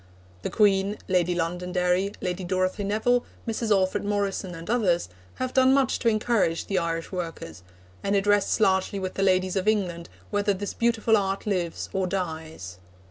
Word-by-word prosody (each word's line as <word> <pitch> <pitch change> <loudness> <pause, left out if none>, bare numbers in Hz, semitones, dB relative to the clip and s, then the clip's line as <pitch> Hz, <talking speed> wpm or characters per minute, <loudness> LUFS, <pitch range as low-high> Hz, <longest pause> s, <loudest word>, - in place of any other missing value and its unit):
The - - -3
Queen, 200 -1 +2
Lady 180 -2 +2
Londonderry, 180 +2 0
Lady 180 0 -2
Dorothy 185 +2 -1
Nevill, 220 +5 +1 0.2
Mrs. 225 0 -2
Alfred 190 -3 +2
Morrison, 200 -3 -2
and 165 0 -9
others, 195 - +1 0.3
have 255 0 -3
done 260 0 +5
much 270 -3 +2
to 235 - -1
encourage 215 -6 +1
the 195 - 0
Irish 165 0 -3
workers, 165 - -6 0.4
and 200 0 0
it 195 0 +1
rests 205 +1 +2
largely 190 -1 +2
with 190 -1 -3
the - - -3
ladies 185 -1 +2
of 190 +1 -1
England 180 -6 0 0.2
whether 205 -1 +1
this 200 +1 -4
beautiful 230 -1 +2
art 195 -1 -1
lives 180 -5 -2
or 190 -1 0
dies. 160 - -5
190 Hz, 165 wpm, -26 LUFS, 180-210 Hz, 0.4 s, done